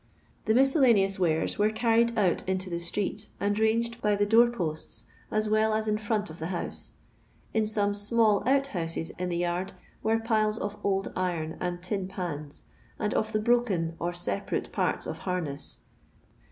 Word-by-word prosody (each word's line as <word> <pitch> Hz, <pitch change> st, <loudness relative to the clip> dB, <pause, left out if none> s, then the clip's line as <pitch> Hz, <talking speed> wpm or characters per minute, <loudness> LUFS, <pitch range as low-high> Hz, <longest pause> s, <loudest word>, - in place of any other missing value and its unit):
The 220 Hz, -, +3 dB
miscellaneous 245 Hz, -, +4 dB
109 160 Hz, -3 st, +1 dB
were 210 Hz, +1 st, +3 dB
carried 230 Hz, 0 st, +2 dB
ont 190 Hz, -5 st, +2 dB
into 185 Hz, -1 st, -1 dB
the 170 Hz, -, -2 dB
street, 205 Hz, +4 st, -1 dB
and 205 Hz, +1 st, 0 dB
ranged 230 Hz, +2 st, +1 dB
by 210 Hz, -1 st, +2 dB
the 205 Hz, 0 st, +2 dB
door 230 Hz, +3 st, +6 dB
posts 165 Hz, -9 st, -3 dB, 0.2 s
as 215 Hz, 0 st, 0 dB
well 215 Hz, 0 st, +2 dB
as 220 Hz, 0 st, 0 dB
in 210 Hz, 0 st, +1 dB
front 210 Hz, -3 st, -1 dB
of 160 Hz, -, -10 dB
the 160 Hz, -, -3 dB
house. 180 Hz, -1 st, -5 dB, 0.6 s
In 220 Hz, -1 st, +2 dB
some 205 Hz, -1 st, +2 dB
small 210 Hz, 0 st, +3 dB
ont 275 Hz, +1 st, +4 dB
houses 165 Hz, -8 st, -3 dB
in 180 Hz, 0 st, -1 dB
the 170 Hz, -, -1 dB
yard 175 Hz, +2 st, -1 dB, 0.3 s
were 220 Hz, +1 st, +2 dB
piles 220 Hz, -1 st, +1 dB
of 205 Hz, -2 st, -3 dB
old 195 Hz, -1 st, 0 dB
iron 170 Hz, -3 st, -2 dB
and 175 Hz, 0 st, -3 dB
tin 190 Hz, 0 st, -2 dB
pans, 160 Hz, -6 st, -5 dB, 0.3 s
and 210 Hz, -1 st, -1 dB
of 220 Hz, 0 st, 0 dB
the 215 Hz, -, +1 dB
broken 210 Hz, -8 st, +1 dB
or 175 Hz, +1 st, -1 dB
separate 105 Hz, -14 st, -2 dB
parts -, -, 0 dB
of -, -, -5 dB
harness. 165 Hz, -6 st, -4 dB
205 Hz, 175 wpm, -28 LUFS, 175-220 Hz, 0.6 s, door